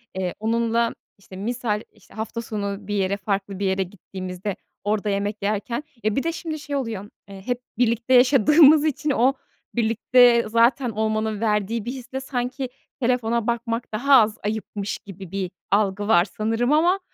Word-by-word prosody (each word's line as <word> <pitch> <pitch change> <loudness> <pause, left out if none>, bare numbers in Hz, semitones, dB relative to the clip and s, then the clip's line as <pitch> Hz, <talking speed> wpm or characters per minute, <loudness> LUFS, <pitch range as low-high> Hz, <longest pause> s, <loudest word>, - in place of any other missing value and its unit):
eee, 185 -2 -2
onunla 230 +1 +1 0.2
işte 195 -1 -14
misal, 215 +1 -2
işte, 215 -3 -22
hafta 220 +1 -4
sonu 200 -3 -4
bir 205 - -3
yere, 195 0 0
farklı 195 -1 -3
bir 200 - -1
yere 190 0 +1
gittiğimizde 185 +1 -6 0.3
orada 210 0 0
yemek 205 +1 -1
yerken 215 +6 -2 0.2
E, 215 - +1
bir 275 - 0
de 330 - 0
şimdi 320 -1 -5
şey 290 -1 -5
oluyor, 225 -7 -3 0.2
eee, 195 -1 -10
hep 245 0 -2 0.2
birlikte 235 +1 +1
yaşadığımız 285 +4 +6
için 305 0 -1
o 260 +1 +3 0.4
birlikte 235 +1 +4
zaten 235 +3 +3
olmanın 220 0 -1
verdiği 215 0 0
bir 240 - -3
hisle 260 0 -6
sanki 255 0 -3 0.3
telefona 235 -2 0
bakmak 235 0 -2
daha 275 +6 +2
az 215 0 0
ayıpmış 205 -1 -3
gibi 195 -3 -11
bir 195 -2 -3 0.2
algı 205 0 +1
var 175 -5 +5
sanırım. 225 +5 -1
Ama 345 +5 +4
220 Hz, 160 wpm, -23 LUFS, 200-245 Hz, 0.4 s, yaşadığımız